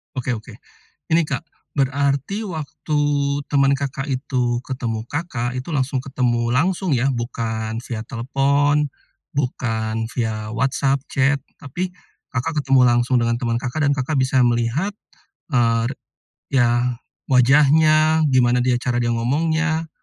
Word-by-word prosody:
Oke, 130 -1 -3
oke. 110 - -12 0.6
Ini 165 - +5
Kak, - - -3 0.3
berarti 140 - 0
waktu 155 -2 -3 0.5
teman 140 -1 +3
Kakak 135 +1 -4
itu 125 -2 -1
ketemu 115 -4 -3
Kakak 120 -4 -3
itu 130 +3 -5
langsung 135 -4 0
ketemu 125 -3 0
langsung 180 +9 +1
ya, 130 +3 +1
bukan 115 -2 -3
via 115 -3 -4
telepon, 140 +4 +1 0.5
bukan 115 -4 -1
via 110 -3 -2
WhatsApp 135 +3 0
chat, 140 0 +2 0.2
tapi, 175 +7 -4 0.4
Kakak 130 +4 -1
ketemu 135 -1 +5
langsung 120 +1 +2
dengan 115 0 +1
teman 115 -1 -1
Kakak, 140 +4 -1
dan 140 - +3
Kakak 140 +2 -2
bisa 130 0 +2
melihat, 120 - +1 0.6
eee, 115 -3 +2 0.6
ya, 120 -1 +2 0.4
wajahnya, 155 +4 +5
gimana 125 -1 +3
dia 125 0 +2
cara 120 -1 -1
dia 120 - 0
ngomongnya? 160 +7 0
130 Hz, 125 wpm, -21 LUFS, 120-145 Hz, 0.6 s, Ini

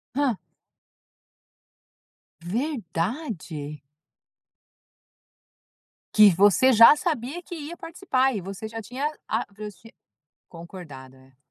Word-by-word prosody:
Hã. 275 -6 +1 2.0
Verdade? 180 - -4 2.3
Que 210 -1 +8
você 205 +7 +5
já 230 +5 +9
sabia 300 0 -3
que 350 - -9
ia 320 +2 -8
participar 270 - -1
e 200 - -3
você 195 +4 -7
já 225 0 -7
tinha 260 +7 -3 0.2
a - - 0
transfi 210 +1 -11 0.6
concordado. 135 -7 -12
215 Hz, 85 wpm, -25 LUFS, 175-270 Hz, 2.3 s, já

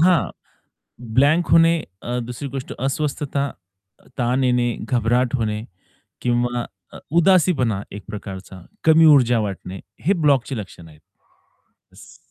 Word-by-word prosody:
हां, 175 0 +3 0.8
ब्लँक 150 +6 +4
होणे 165 +1 +6 0.3
अ, 120 +1 -3
दुसरी 125 +4 -6
गोष्ट 135 -1 -6
अस्वस्थता, 140 +1 -2 0.7
ताण 125 +2 +1
येणे, 125 -1 +2 0.2
घबराट 120 +1 +1
होणे 110 -2 -2 0.6
किंवा 120 0 0 0.3
अ, - - -9 0.2
उदासीपणा, 160 - +3
एक 100 0 -8
प्रकारचा 95 -2 -8 0.2
कमी 160 0 +6
ऊर्जा 125 -3 +3
वाटणे 95 -2 -5 0.3
हे 195 - +4
ब्लॉकची 135 -3 +2
लक्षण 90 -4 -9
आहेत. 75 -1 -17 0.9
येस. - - -16
125 Hz, 115 wpm, -21 LUFS, 115-145 Hz, 0.9 s, होणे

